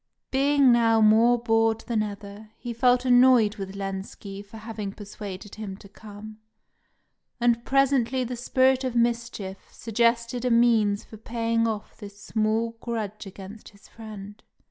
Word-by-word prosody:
Being 275 0 +4
now 230 -1 +4
more 220 +3 +5
bored 225 -1 +1
than 230 -3 -1
ever, 205 0 -7
he 240 -1 -6
felt 250 +1 +2
annoyed 245 -4 +5
with 195 -1 -6
Lenski 195 0 -6
for 205 +2 -13
having 215 -2 -6
persuaded 205 -1 -9
him 205 -3 -7
to 200 - -15
come; 215 +1 -12 1.0
and 235 -1 +2
presently 265 -2 +2
the 250 +1 -4
spirit 260 +2 +2
of 255 -2 -3
mischief 235 -5 -2
suggested 235 +2 0
a 250 - +1
means 230 -4 +3
for 220 - -12
paying 230 +1 -1
off 215 -1 -5
this 205 -2 -11
small 225 +2 -1
grudge 215 -3 -5
against 195 +3 -11
his 200 -1 -20
friend. 210 -2 -11
225 Hz, 145 wpm, -25 LUFS, 205-240 Hz, 1.0 s, more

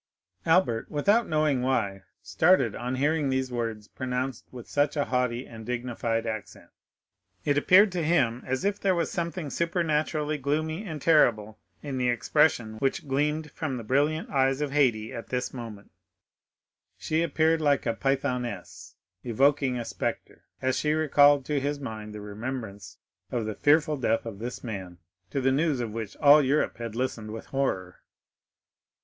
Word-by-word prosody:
Albert, 160 -10 +2
without 205 +10 +2
knowing 155 -4 +1
why, 115 -7 0 0.2
started 115 - +3
on 125 +2 -3
hearing 145 +2 +1
these 130 -1 -1
words 115 -3 -3
pronounced 130 0 -4
with 125 -3 -10
such 145 +1 0
a 145 - +1
haughty 125 -1 -1
and 115 -1 -10
dignified 120 -1 -2
accent; 110 -3 -6 0.7
it 145 - +2
appeared 185 +8 +6
to 180 -1 -2
him 130 -8 +2
as 130 +6 -2
if 205 0 0
there 190 -2 +2
was 170 -2 -1
something 170 -1 -3
supernaturally 155 -3 0
gloomy 155 +6 -1
and 155 -7 -6
terrible 110 -9 +3 0.2
in 140 -3 -4
the 125 -1 +1
expression 120 -3 +1
which 135 +3 -1
gleamed 150 +3 -1
from 145 -5 -3
the 115 - -6
brilliant 145 +7 +1
eyes 135 0 +2
of 150 -2 -2
Haydée 120 -7 +2
at 115 - -7
this 125 -1 -3
moment; 115 -5 -9 1.1
she 160 +1 -1
appeared 160 -1 +2
like 145 -2 +2
a 115 - +1
Pythoness 125 -6 -3 0.3
evoking 135 +2 +2
a 120 - -4
spectre, - - -5 0.2
as 130 0 +1
she 150 0 +1
recalled 145 -2 +4
to 150 -2 0
his 145 +1 -2
mind 110 -5 -6
the 105 0 -8
remembrance 105 -2 -6 0.3
of 115 -3 -1
the 110 - -3
fearful 150 +5 +3
death 115 -3 0
of 110 -4 -7
this 120 +3 -6
man, 95 -7 -6 0.3
to 135 - -2
the 135 0 +2
news 145 0 +1
of 115 -3 -3
which 110 -3 -6
all 145 0 +7
Europe 140 +2 +1
had 115 -2 -6
listened 115 -3 -3
with 110 +1 -7
horror. 95 -10 -2
130 Hz, 160 wpm, -27 LUFS, 115-150 Hz, 1.1 s, all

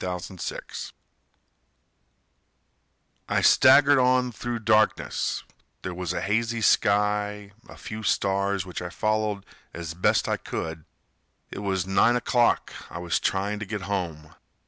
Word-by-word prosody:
Oscar 90 0 -4 0.2
Hummel - - -7 2.7
I - - +1
staggered 140 +1 +6
on 125 0 +3
through 120 +1 -4
darkness, 110 -1 +1 0.4
There 90 - -4
was 90 -1 -4
a - - -3
hazy 115 +2 0
sky, 105 0 +1 0.2
a - - -12
few 110 0 -7
stars 100 -2 0
Which 90 -1 -6
I 90 - -5
followed 110 0 -1 0.3
as 85 -1 -5
best 90 - +1
I - - 0
could. 80 -1 -6 0.7
It - - -6
was 95 -3 -1
nine 100 +5 +3
o'clock, 120 0 +1 0.2
I - - -7
was 85 -1 -1
trying 100 +2 -1
to 110 - -5
get 105 -1 -4
home. 85 -6 -4
100 Hz, 130 wpm, -25 LUFS, 90-110 Hz, 2.7 s, staggered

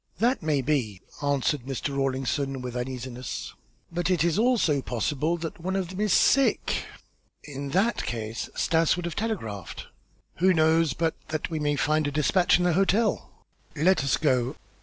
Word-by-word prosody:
"That 245 +4 +1
may 150 -4 0
be," 125 -9 -1 0.2
answered 145 -1 +1
Mr. 140 +1 -3
Rawlinson, 135 0 -1
with 125 -1 -5
uneasiness, 125 0 -5 0.4
"but 175 +1 -1
it 175 -3 +2
also 230 -5 +3
may - - +1
be - - -4
possible 145 +8 -1
that 165 0 -6
one 190 +3 -2
of 190 -3 -1
them 185 +2 -5
is 210 -2 +1
sick." 275 0 +3 0.6
"In 140 -1 -6
that 195 +10 +1
case 110 -1 -4
Stas 165 -1 +2
would 175 -1 -4
have 170 -2 -4
telegraphed." 115 - -4 0.5
"Who 185 +2 +4
knows 160 -1 +3
but 165 +1 0
that 155 +1 -3
we 160 - -2
may 145 -1 +1
find 155 +2 +1
a - - -2
despatch 155 +5 +3
in 180 - -1
the 175 -1 +3
hotel?" 195 +5 +1 0.5
"Let 165 +1 +3
us 140 - +2
go." 130 -4 +1
155 Hz, 170 wpm, -26 LUFS, 135-175 Hz, 0.6 s, Who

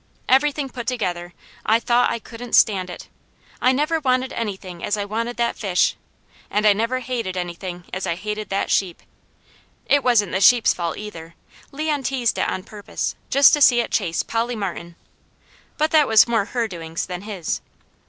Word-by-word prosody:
Everything 280 +2 +2
put 245 -3 -8
together, 175 -8 -2 0.3
I 220 +2 +3
thought 240 +1 +2
I 235 - -1
couldn't 235 +1 -10
stand 190 -4 +3
it. 175 - -9 0.5
I 255 - +4
never 300 +5 +1
wanted 255 -2 0
anything 190 -6 -5
as 205 - 0
I 205 - -2
wanted 230 +4 -3
that 235 0 0
fish, 190 -4 +1 0.5
and 210 +1 0
I 210 - +7
never 230 +5 -1
hated 230 -7 -3
anything 175 0 -5
as 185 - -3
I 170 - 0
hated 210 +2 -5
that 195 0 -1
sheep. 180 -4 0 0.8
It 285 -1 +3
wasn't 220 -6 +3
the 190 - -1
sheep's 240 +3 +6
fault 170 -2 -3
either; 170 -6 -9 0.4
Leon 300 0 -1
teased 250 -3 0
it - - +1
on 185 - -4
purpose, 205 0 -5 0.2
just 280 +4 +6
to 295 - +2
see 245 -3 +6
it 235 - -1
chase 165 -1 0
Polly 230 +1 -2
Martin; 175 -4 -5 0.8
but 310 +1 +1
that 305 -3 +5
was 220 +1 +6
more 225 -4 +1
her 235 +1 -2
doings 165 -4 -5
than 180 -1 -6
his. 200 -5 -4
220 Hz, 180 wpm, -22 LUFS, 185-250 Hz, 0.8 s, I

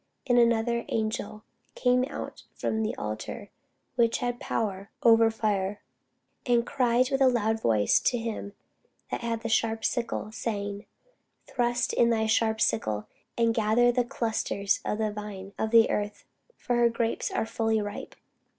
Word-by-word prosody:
And 245 -2 +4
another 235 0 +2
angel 215 -1 -2 0.3
came 250 0 +3
out - - -7
from 220 - -1
the 220 0 -1
altar, 110 - -6 0.4
which 230 -2 +3
had 245 -1 -2
power 200 -3 -3
over 225 -1 +6
fire; 205 -3 -1 0.6
and 240 -1 +2
cried 250 -1 +2
with 270 0 0
a 265 - +7
loud 225 -3 +1
cry 105 -2 +2
to 245 - +3
him 225 -3 -5 0.6
that - - -2
had 230 -1 -3
the - - -2
sharp 225 0 +1
sickle, 235 -3 -2
saying, 205 -2 -4 0.6
Thrust 240 0 0
in 235 - +4
thy 220 -1 +2
sharp 220 0 +2
sickle, 110 - 0 0.3
and 230 -1 +3
gather 225 +2 +3
the 245 0 +1
clusters 225 -5 -1
of 210 - -2
the 215 -1 0
vine 205 -2 -7
of 220 - 0
the 225 0 +5
earth; 205 0 -3 0.3
for 245 -1 -1
her 235 0 +5
grapes 230 0 -1
are - - -1
fully 225 0 0
ripe. 205 -1 -6
225 Hz, 155 wpm, -28 LUFS, 210-235 Hz, 0.6 s, a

